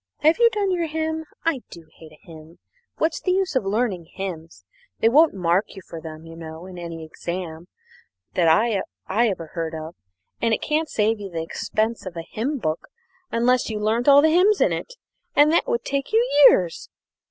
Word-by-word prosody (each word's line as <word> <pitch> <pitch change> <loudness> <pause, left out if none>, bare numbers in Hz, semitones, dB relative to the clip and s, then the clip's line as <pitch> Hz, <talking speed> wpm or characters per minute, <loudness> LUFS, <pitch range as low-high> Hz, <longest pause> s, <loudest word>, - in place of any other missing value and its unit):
Have 315 +7 +4
you 470 -1 +6
done 410 -3 -1
your 345 -2 0
hymn? 320 0 -3 0.2
I 330 -6 +1
do 170 -2 -12
hate 160 -1 -13
a 155 - -17
hymn. 160 0 -13 0.4
What's 320 0 0
the 365 - +1
use 375 -5 0
of 260 - +2
learning 200 -4 -1
hymns? 165 - -7 0.3
They 225 - +4
won't 300 +1 +5
mark 180 +3 0
you 190 - -10
for 165 -1 -8
them, 160 0 -9
you 165 0 -11
know, 160 +1 -9
in 185 -1 -9
any 165 -2 -7
exam. 170 +1 -6 0.7
I 190 +5 +3 0.3
ever 190 -6 0
heard 165 -2 -3
of, 160 +1 -7 0.5
and 230 -1 +3
it - - -8
can't 310 +1 0
save 220 +1 +1
you 200 -1 -6
the 165 -2 -4
expense 215 +5 -2
of 175 -2 -7
a 165 - -4
hymnbook 225 - -3 0.4
unless 245 +2 +2
you 215 -1 -3
learnt 220 +4 0
all 285 0 +8
the 315 - +5
hymns 390 +4 +4
in - - +3
it, - - -6 0.4
and 295 +1 +6
that 340 - +2
would 475 -1 -1
take 275 0 -2
you 460 +3 +3 0.2
years. 175 -3 0
210 Hz, 190 wpm, -23 LUFS, -, 0.7 s, all